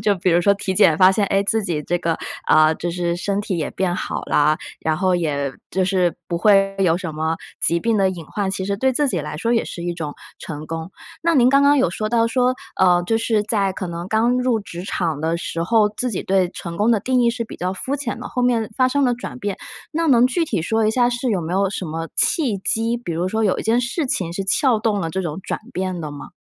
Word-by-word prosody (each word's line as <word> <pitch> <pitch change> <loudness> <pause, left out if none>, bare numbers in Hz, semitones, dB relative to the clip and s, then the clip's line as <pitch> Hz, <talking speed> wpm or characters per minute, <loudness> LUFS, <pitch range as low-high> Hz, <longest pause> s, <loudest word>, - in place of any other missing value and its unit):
就 210 -1 +3
比 185 0 +1
如 170 +1 +4
说 200 +3 +4
体 195 -1 -3
检 160 -3 +5
发 185 0 +7
现 205 0 +1
哎， 195 +1 +2
自 220 +2 +1
己 160 -5 -2
这 175 +4 -1
个， 170 -2 -1 0.3
呃， 155 0 +6
就 175 - -3
是 175 -1 -1
身 195 +3 -1
体 195 -3 -3
也 155 - -2
变 185 -2 -1
好 - - -4
了， 150 +1 +2 0.2
然 160 -1 0
后 185 +2 +1
也 145 -5 -1 0.2
就 190 0 +1
是 185 -2 +1
不 170 - -1
会 195 0 +4
有 175 -4 +3
什 180 -4 -5
么， 160 +1 -1 0.2
疾 170 - +2
病 230 +2 +1
的 195 -1 +3
隐 175 -3 -7
患， 200 +2 -2
其 190 -1 -3
实 200 +1 -1
对 260 +5 +1
自 290 +3 +1
己 190 - -1
来 150 +1 -6
说 230 +9 0
也 230 - +2
是 170 - -7
一 175 - -1
种 150 -4 -5 0.3
成 150 -1 -6
功。 165 +2 -5 0.3
那 335 0 +2
您 250 -2 +5
刚 275 +2 +5
刚 285 +1 +5
有 255 - +3
说 215 +4 -3
到 230 0 +2
说， 250 +1 +2 0.3
呃， 180 -1 +5
就 225 +5 +1
是 225 -2 +1
在 200 -3 0
可 185 - -5
能 170 +1 -5
刚 230 +4 +2
入 250 -2 +1
职 175 -3 -8
场 165 -6 -2
的 165 +2 0
时 170 0 -4
候， 215 +2 +3
自 215 +4 -3
己 195 - -3
对 190 -1 +2
成 170 -2 -7
功 210 +5 +2
的 225 - +3
定 255 +4 +1
义 235 - +4
是 235 0 -3
比 - - -10
较 180 +1 -2
肤 260 +8 -3
浅 275 -4 -4
的， - - -6
后 250 - -2
面 235 -3 +1
发 255 -1 +4
生 285 +2 +1
了 245 -1 +2
转 250 +1 -7
变， 205 -5 -3 0.4
那 330 +1 0
能 245 -3 +6
具 330 +7 0
体 285 - -2
说 220 +4 +1
一 - - +3
下 240 +1 +3
是 245 +1 -1
有 195 -4 +1
没 165 +1 -4
有 195 +1 +2
什 195 - -4
么 165 +1 -4
契 285 - +2
机， 225 +4 0
比 230 -8 -5
如 175 +3 -1
说 220 +3 -1
有 195 - +1
一 - - -3
件 230 +2 +2
事 265 +6 -2
情 180 -9 -2
是 195 +3 -3
撬 230 +5 +2
动 215 -2 0
了 165 - -2
这 190 - -2
种 165 -2 -4
转 - - -4
变 185 -1 -3
的 155 -2 -5
吗？ 145 0 -9
195 Hz, 285 characters per minute, -21 LUFS, 170-230 Hz, 0.4 s, 发